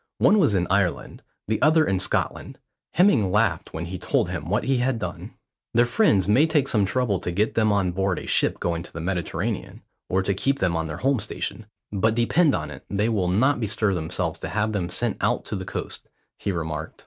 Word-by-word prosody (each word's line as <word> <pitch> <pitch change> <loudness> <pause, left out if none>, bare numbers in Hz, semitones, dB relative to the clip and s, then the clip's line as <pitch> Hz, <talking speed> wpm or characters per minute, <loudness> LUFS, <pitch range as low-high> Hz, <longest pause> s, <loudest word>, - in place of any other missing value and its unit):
One 210 - +4
was 130 - +3
in 90 -2 +1
Ireland, 100 -3 0 0.3
the 110 +1 -1
other 155 +1 +5
in 95 -1 0
Scotland. - - -2 0.4
Hemming 170 - +4
laughed 105 +3 +1
when 80 +1 -5
he 90 +1 -6
told - - 0
him - - -5
what - - +1
he 135 -1 +1
had 125 0 0
done. - - -6 0.4
"Their 120 +1 +5
friends 120 - +3
may 130 +10 +4
take 150 -4 +1
some 105 -6 +2
trouble 110 -3 0
to - - -4
get 105 +5 0
them 110 -2 +2
on 100 -3 +1
board 95 0 0
a - - -6
ship - - +1
going 85 -1 -1
to - - -12
the 85 - -7
Mediterranean, 95 +4 -3 0.3
or 95 +1 +1
to 100 - 0
keep 135 +8 +1
them 90 -9 0
on 80 0 -1
the 75 - -5
Home 135 -1 +1
station; 105 +1 -4 0.2
but 110 +2 +1
depend 140 +6 +3
on 75 -2 -4
it 70 - -10
they 105 +3 0
will 100 -6 0
not 125 +10 +2
bestir 110 -2 0
themselves 85 -1 -2
to - - -5
have 105 +1 0
them 90 -4 -2
sent - - -1
out - - 0
to - - -4
the - - -5
Coast," - - -5 0.3
he 100 - -2
remarked. 80 -3 -4
100 Hz, 220 wpm, -24 LUFS, 90-120 Hz, 0.4 s, other